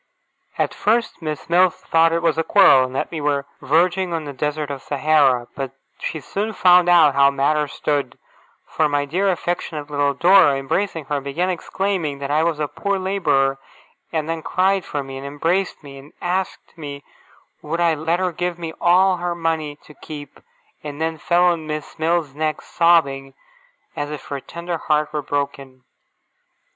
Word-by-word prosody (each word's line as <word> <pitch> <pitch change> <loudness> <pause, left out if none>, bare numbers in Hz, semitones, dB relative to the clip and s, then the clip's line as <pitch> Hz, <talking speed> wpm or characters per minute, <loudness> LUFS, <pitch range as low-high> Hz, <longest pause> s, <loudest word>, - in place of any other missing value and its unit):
At - - 0
first 230 0 0
Miss 155 -2 -5
Mills 180 +1 +4
thought 165 0 +2
it 170 0 -1
was 165 -2 +2
a - - +2
quarrel, 135 -9 +6
and 130 - -10
that - - -2
we 160 -3 -4
were 145 -1 0 0.2
verging 175 +4 +1
on 160 -2 -3
the 145 - -6
Desert 150 +1 -3
of 135 -2 -6
Sahara; 140 -4 +2
but 135 -1 -5 0.3
she 160 - -4
soon 205 +8 -3
found 180 -2 +5
out 165 -5 +6
how 140 0 +5
matters 145 +1 0
stood, 140 -4 -2 0.5
for 155 -1 0
my 145 0 0
dear 185 +7 0
affectionate 170 -4 -3
little 145 -1 +1
Dora, 175 -2 +5
embracing 155 +4 -2
her, 145 0 -2
began 165 +7 -1
exclaiming 180 -4 -2
that 140 0 -5
I 150 +2 +3
was 165 -2 0
'a 150 - 0
poor 180 +7 -2
labourer'; 175 -8 +1 0.5
and 160 -2 -2
then 165 0 -3
cried 190 +2 +1
for 145 -2 -3
me, 135 0 -8
and 140 - -7
embraced 165 +6 -1
me, 140 -1 -11
and 140 +2 -16
asked 185 +2 -3
me 145 -3 -8 0.6
would 160 +3 -3
I 170 -1 +3
let 160 +3 -1
her 185 -1 0
give 175 +1 -3
me 165 -2 -6
all 185 +2 +4
her 175 0 -3
money 160 -3 -2
to 150 - -15
keep, 145 -1 -10 0.4
and 145 -1 -7
then 160 0 -2
fell 175 +3 +2
on 170 -3 +1
Miss 155 +1 -6
Mills's 160 -3 0
neck, 155 +1 -2
sobbing 140 -6 +2 0.6
as 145 - -3
if 150 -1 -7
her 140 - -3
tender 170 +4 -6
heart 150 0 0
were 150 - -1
broken. 140 -2 -4
155 Hz, 180 wpm, -21 LUFS, 145-175 Hz, 0.6 s, quarrel